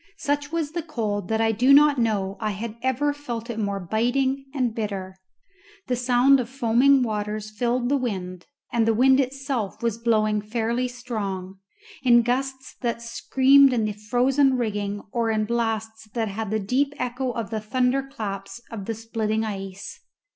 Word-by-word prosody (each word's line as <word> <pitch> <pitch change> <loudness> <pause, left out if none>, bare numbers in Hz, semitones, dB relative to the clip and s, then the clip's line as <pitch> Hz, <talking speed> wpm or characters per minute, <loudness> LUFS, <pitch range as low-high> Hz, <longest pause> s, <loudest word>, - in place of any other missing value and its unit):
Such 290 -3 -1
was 325 -3 -2
the 340 +1 -2
cold 210 - -3
that 220 +1 0
I 225 0 +3
do 245 +5 +3
not 290 -2 +5
know 200 -4 0
I 215 - -1
had 210 +2 -5
ever 260 +3 +1
felt 240 -5 -5
it 225 - -5
more 200 -2 -1
biting 255 +8 0
and 255 -5 -1
bitter. 195 -4 -4 0.7
The 250 - 0
sound 250 +2 +4
of 235 -2 -3
foaming 260 +1 +4
waters 215 -1 -3
filled 240 +3 0
the 280 +2 +2
wind, 185 -8 -4 0.3
and 230 -1 +2
the 225 - +3
wind 265 +3 +5
itself 265 -5 -2
was 230 -1 0
blowing 215 -2 +2
fairly 230 +3 -1
strong, 200 -7 -5 0.4
in 240 -2 +5
gusts 265 +2 -2
that 235 -1 -2
screamed 265 +3 +4
in 225 -3 +1
the 215 - -1
frozen 255 +6 +2
rigging 205 -3 -2
or 235 -1 0
in 215 -1 +1
blasts 225 -1 -2
that 225 -2 0
had 215 +1 -4
the 215 +1 0
deep 270 +8 0
echo 250 +1 -2
of 230 -3 -4
the 220 -1 -2
thunder 250 +4 +1
claps 205 -7 -6
of 210 -4 -6
the 225 - -3
splitting 220 -1 -2
ice. 195 -2 -6
230 Hz, 170 wpm, -24 LUFS, 215-260 Hz, 0.7 s, not